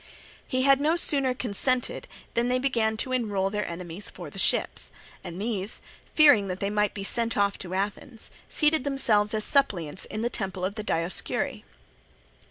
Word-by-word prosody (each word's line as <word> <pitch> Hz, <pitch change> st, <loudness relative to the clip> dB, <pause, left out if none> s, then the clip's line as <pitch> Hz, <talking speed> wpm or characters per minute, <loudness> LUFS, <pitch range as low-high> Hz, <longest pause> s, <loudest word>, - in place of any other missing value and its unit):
He 255 Hz, 0 st, 0 dB
had 275 Hz, 0 st, +4 dB
no 310 Hz, +3 st, +2 dB
sooner 275 Hz, -6 st, +3 dB
consented, 250 Hz, +2 st, 0 dB, 0.3 s
than 235 Hz, +1 st, +1 dB
they 250 Hz, 0 st, +1 dB
began 230 Hz, -4 st, 0 dB
to 255 Hz, -, -2 dB
enroll 205 Hz, -6 st, -1 dB
their 210 Hz, 0 st, -2 dB
enemies 175 Hz, +3 st, -4 dB
for -, -, -10 dB
the -, -, -8 dB
ships; -, -, +1 dB, 0.3 s
and 175 Hz, 0 st, -7 dB
these, 210 Hz, -1 st, -2 dB, 0.4 s
fearing 290 Hz, -10 st, +6 dB
that 185 Hz, 0 st, -4 dB
they 200 Hz, 0 st, -2 dB
might 210 Hz, 0 st, 0 dB
be 200 Hz, -, -5 dB
sent 230 Hz, +3 st, -1 dB
off 200 Hz, 0 st, +1 dB
to 185 Hz, 0 st, -5 dB
Athens, 205 Hz, +4 st, -3 dB, 0.2 s
seated 305 Hz, -2 st, +2 dB
themselves 220 Hz, -7 st, +3 dB
as 215 Hz, -, +1 dB
suppliants 190 Hz, -, +3 dB
in 215 Hz, +1 st, -5 dB
the 240 Hz, -, 0 dB
temple 190 Hz, -4 st, -3 dB
of 195 Hz, -, -3 dB
the 215 Hz, 0 st, -6 dB
Dioscuri. 170 Hz, -3 st, -2 dB
215 Hz, 175 wpm, -26 LUFS, 195-255 Hz, 0.4 s, fearing